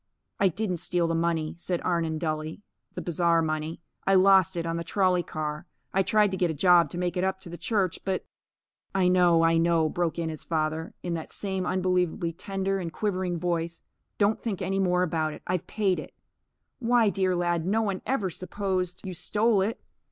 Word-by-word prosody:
"I 195 - +5
didn't 185 0 -1
steal 175 0 0
the 165 - 0
money," 165 -2 0
said 175 0 -1
Arnon, 165 -3 0
dully, 155 +3 -3 0.3
"the - - -4
bazaar 170 0 +2
money. 155 +1 -3 0.3
I 195 - +5
lost 190 -1 +5
it 170 - -1
on 165 0 -1
the 170 - -3
trolley 185 -1 +2
car. 155 +1 -5 0.3
I 195 - +3
tried 210 +1 +3
to 190 - -2
get 175 -1 +1
a 160 - -2
job 175 +2 +5
to 175 - -7
make 180 0 -1
it 180 - +1
up 190 0 0
to 175 - -10
the 170 - -6
church, 190 0 0
but 190 -1 -2 0.4
" - - -67 0.3
"I 190 -2 +3
know, 175 -2 +5
I 165 0 +4
know," 165 -1 +3
broke 175 -1 -1
in 165 -1 -1
his 155 -2 -6
father, 160 0 -2
in 175 - -2
that 160 -1 -5
same 190 -2 -3
unbelievably 180 -2 0
tender 195 +2 -2
and 170 -3 -4
quivering 185 -2 -1
voice, 170 -1 -2 0.4
"Don't 210 +1 +2
think 210 -6 -3
any 195 +1 -1
more 180 -1 +2
about 160 -3 -1
it. - - -11
I've 180 -1 -2
paid 200 -4 +1
it. - - -9 0.6
Why, 235 -3 +3
dear 185 -2 +1
lad, 175 -1 0
no 220 +3 +2
one 195 -3 -2
ever 215 -8 -1
supposed 185 0 -3
you 185 - -4
stole 210 +4 +1
it. 215 +5 -2
180 Hz, 205 wpm, -27 LUFS, 165-190 Hz, 0.6 s, I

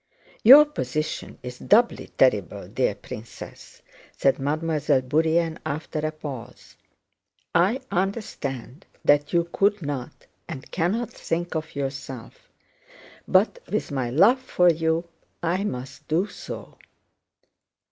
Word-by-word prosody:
"Your 275 +6 +10
position 155 - -4
is 125 0 -7
doubly 235 +3 +3
terrible, 105 -10 +1
dear - - 0
princess," 115 +2 -10 0.3
said 135 0 +2
Mademoiselle 150 -1 +1
Bourienne 160 +4 +1
after 155 +1 -4
a 155 +1 -1
pause. 145 -6 -9 0.8
"I 200 +10 +3
understand 165 - -3 0.2
that 145 0 +4
you 170 -1 +2
could 200 -2 +2
not, 140 -4 -5 0.2
and 130 - -8
cannot, 205 +7 -1
think 175 -5 -3
of 160 -1 -4
yourself, 135 -3 -6 0.8
but - - +3
with - - -1
my 130 -4 -1
love 195 - +5
for 180 -8 +3
you 160 +1 0 0.4
I 175 +4 0
must 135 -2 -6
do 165 +5 +2
so.... - - -9
155 Hz, 115 wpm, -25 LUFS, 135-180 Hz, 0.8 s, Your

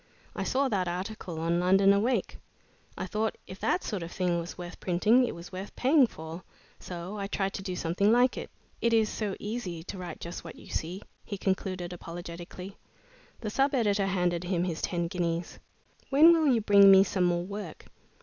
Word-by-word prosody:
"I - - -3
saw 275 +1 +1
that 195 -7 0
article 180 -1 -4
on 170 +1 +1
'London 195 +2 +5
Awake.' 225 +6 0 0.6
I - - -3
thought 215 +3 -2
if 185 - -10
that 365 - 0
sort 205 -5 -3
of 170 +1 -6
thing 180 -2 0
was 170 +1 -7
worth 175 0 -8
printing, 215 +8 +3
it - - -5
was 170 +2 -10
worth 190 +2 -7
paying 270 0 +4
for, 160 -2 -8 0.4
so 180 +4 -6
I 200 - -3
tried 195 -1 -1
to - - -4
do 190 -2 -4
something 180 +5 +1
like 245 +2 +4
it. - - -6 0.3
It 235 0 +2
is 220 -1 +4
so 210 -3 -3
easy 205 -7 -4
to 190 +2 -7
write 180 -1 -7
just 170 +1 -7
what 165 - -9
you - - -14
see," 180 +5 -4 0.2
he 200 - -6
concluded, 185 -2 -2
apologetically. 175 +2 -8 0.6
The 215 -3 -3
sub 275 +4 +2
editor 205 -5 +2
handed 180 -2 0
him 175 -1 0
his 170 -3 -3
ten 170 -1 -1
guineas. 170 -1 -3 0.5
"When 310 +5 +7
will 315 -4 +3
you 235 -3 +2
bring 200 -1 +7
me 195 0 +8
some 185 -2 0
more 175 0 +1
work?" 200 -3 -7
190 Hz, 195 wpm, -29 LUFS, 175-210 Hz, 0.6 s, me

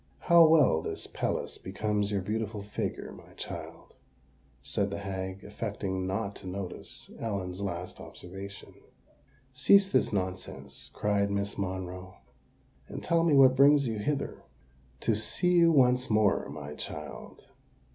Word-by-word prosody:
"How 170 -2 +7
well 155 - +5
this - - -4
pelisse - - -3
becomes 105 +1 -1
your 100 -2 0
beautiful 105 0 -3
figure, 105 - -4
my - - -14
child," - - -8 0.7
said 100 +6 -1
the 100 - -4
hag, 95 -1 -5
affecting 100 -3 -3
not 100 +1 -2
to - - -10
notice 95 0 -7
Ellen's 95 -4 -3
last 90 -2 -4
observation. 95 +2 -9 0.8
"Cease 195 +10 +5
this - - +2
nonsense," 95 -2 -4
cried 100 -1 +1
Miss 100 0 -1
Monroe; 95 -1 -5 0.7
"and - - -7
tell 170 0 +2
me 160 -3 +4
what 130 -1 +7
brings 140 0 +6
you 110 -2 -2
hither." 140 +6 -2 0.6
"To 115 - +2
see 110 - 0
you 170 -1 +6
once 125 -3 +4
more, 105 -7 +2
my 75 0 -7
child." 75 -1 -7
100 Hz, 135 wpm, -29 LUFS, 95-125 Hz, 0.8 s, How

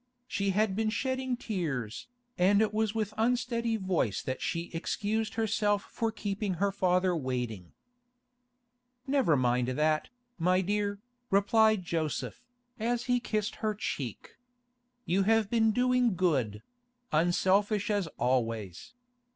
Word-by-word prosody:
She 200 0 -1
had 200 0 +1
been 220 +1 +1
shedding 260 +2 -1
tears, 150 - -3 0.3
and 195 +3 +4
it 215 -1 +2
was 220 0 0
with 215 -2 -1
unsteady 235 0 +1
voice 180 - -1
that 130 0 -4
she 170 +1 -3
excused 215 +6 -2
herself 210 -2 +1
for 225 -1 -1
keeping 200 -2 -3
her 200 +3 +1
father 185 -1 +2
waiting. 125 - -3 1.3
'Never 265 - +3
mind 125 -1 +1
that, 155 +4 +1 0.3
my 180 +2 +3
dear,' 205 +1 -1 0.3
replied 215 0 +4
Joseph, 165 +6 -3 0.4
as 235 +2 0
he 245 0 +2
kissed 215 -3 -2
her 215 -1 -1
cheek. 135 - -5 0.7
'You 185 +3 +2
have 220 +1 +2
been 225 -2 +4
doing 250 -2 +2
good—unselfish 190 - 0
as 200 -4 0
always. 115 - -1
200 Hz, 120 wpm, -30 LUFS, 165-225 Hz, 1.3 s, and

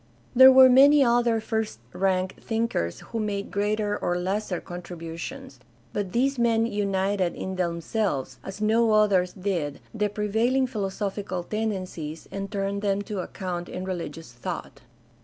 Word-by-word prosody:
There 260 +1 +10
were 260 0 +9
many 275 +3 +7
other 235 -2 +3
first 220 - -2 0.2
rank 185 0 0
thinkers 225 - -2
who 230 - -2
made 205 -2 -3
greater 205 +1 0
or 175 - -1
lesser 190 +1 -2
con 175 0 -8
tributions, 170 +11 -8 0.3
but 200 -3 -2
these 260 +4 +1
men 230 -1 +3
united 200 -3 0
in 190 0 -4
themselves, 170 - -2
as 195 +1 -7
no 220 +1 +3
others 200 -4 +3
did, 180 -7 -2
the 210 -2 0
prevailing 220 +6 +1
philosophical 200 -4 -3
tendencies, 185 -7 -4
and 195 0 -5
turned 200 0 -2
them 200 -1 0
to 205 -1 -5
account 180 -1 -5
in 185 - -5
religious 165 -5 -5
thought. 120 - -6
200 Hz, 140 wpm, -26 LUFS, 180-225 Hz, 0.3 s, There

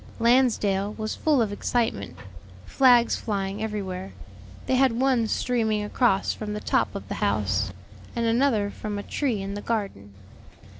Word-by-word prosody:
Lansdale 225 -5 +2
was 220 -1 -3
full 295 -6 +2
of 210 - -3
excitement, 215 - -1 0.5
flags 245 -3 +4
flying 200 -1 -3
everywhere; 195 -3 -4 0.5
they - - 0
had 260 -1 +4
one 255 -4 +2
streaming 220 -2 0
across 210 -2 +1
from 210 -1 -5
the - - -3
top - - 0
of - - -6
the - - -4
house, 100 -1 0 0.4
and 235 - 0
another 225 -3 +2
from 210 -1 -5
a 205 - -5
tree 235 -7 -2
in 195 +1 -5
the 205 - -5
garden. 195 - -4
215 Hz, 150 wpm, -25 LUFS, 195-240 Hz, 0.5 s, flags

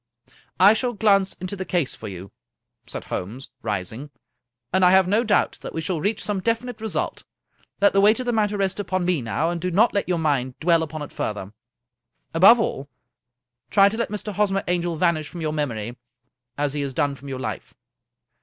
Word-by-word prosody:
" - - -31
I - - +7
shall 245 +2 -1
glance 200 -2 +2
into 185 +2 -6
the 190 - -4
case 175 -7 -1
for 110 - -8
you," 95 -1 -8 0.6
said - - -6
Holmes, 115 +9 -6
ris 100 -5 -2
ing, 135 +7 -8 0.3
" 120 +2 -53
and 190 0 +3
I 180 - +7
have 190 0 +5
no 210 +5 +2
doubt 210 -3 +1
that - - -7
we 160 - -1
shall 165 -1 -2
reach 210 +4 -1
some 205 -2 -1
definite 230 +3 -2
result. 220 -1 -3 0.6
Let 200 0 +4
the 195 - +4
weight 215 +4 +5
of 255 - -3
the 240 - 0
matter 210 -2 +1
rest 195 0 -1
upon 185 -2 -1
me 175 -5 +1
now, 145 +8 -1
and 170 -1 -4
do 180 - -1
not 210 +7 +3
let 200 -2 -1
your 180 - +1
mind 140 -5 -1
dwell 165 0 +3
upon 155 -1 -4
it 145 - -9
further. 105 -1 -4 0.8
Above 195 +9 +7
all, 140 -10 -2 0.8
try 200 -1 +6
to 220 - -5
let 235 - -1
Mr. 210 0 -5
Hosmer 195 -1 +1
Angel 175 -1 0
vanish 160 -2 +1
from 175 - -8
your 155 -1 -1
mem 150 -2 0
ory, 115 +1 -5 0.6
as 145 -1 0
he 145 - -2
has 135 -2 -4
done 145 +1 +1
from 140 +1 -11
your 135 - -4
life." - - -6
175 Hz, 215 wpm, -23 LUFS, 140-200 Hz, 0.8 s, I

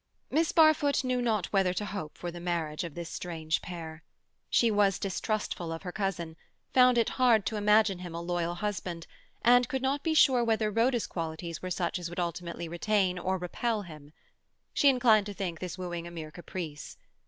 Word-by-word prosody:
Miss 320 +3 +2
Barfoot 310 -3 +4
knew 255 -1 0
not 215 -7 0
whether 190 -2 +2
to 210 - -2
hope 160 -7 -6
for 175 - -5
the 175 - -8
marriage 170 -2 -2
of 170 -4 -7
this 170 -1 -5
strange 160 -3 -3
pair. 165 -2 -7 0.5
She 230 -2 +3
was 205 -2 +3
distrustful 195 -3 -2
of 165 +2 -6
her 180 - -5
cousin, 175 -5 -3 0.4
found 250 -1 +6
it 230 - +3
hard 230 -5 +5
to 215 - -2
imagine 210 -2 +3
him 175 -2 -7
a 170 - -4
loyal 175 0 -1
husband, 180 -3 -4 0.4
and 245 +1 +5
could 265 -1 -2
not 275 +2 0
be 320 +2 0
sure 260 -5 +5
whether 220 -2 +1
Rhoda's 235 +2 +2
qualities 165 0 -5
were 185 - -4
such 180 +1 -1
as 175 -1 -5
would 175 - -6
ultimately 170 0 -3
retain 185 +1 0
or 190 +2 -1
repel 210 +5 -2
him. 150 -4 -12 0.6
She 285 - +5
inclined 230 -6 +4
to 205 - -6
think 180 -5 -4
this 180 -1 -5
wooing 175 -2 -5
a - - -7
mere 160 -3 -7
caprice. 165 -3 -7
185 Hz, 190 wpm, -29 LUFS, 170-220 Hz, 0.6 s, found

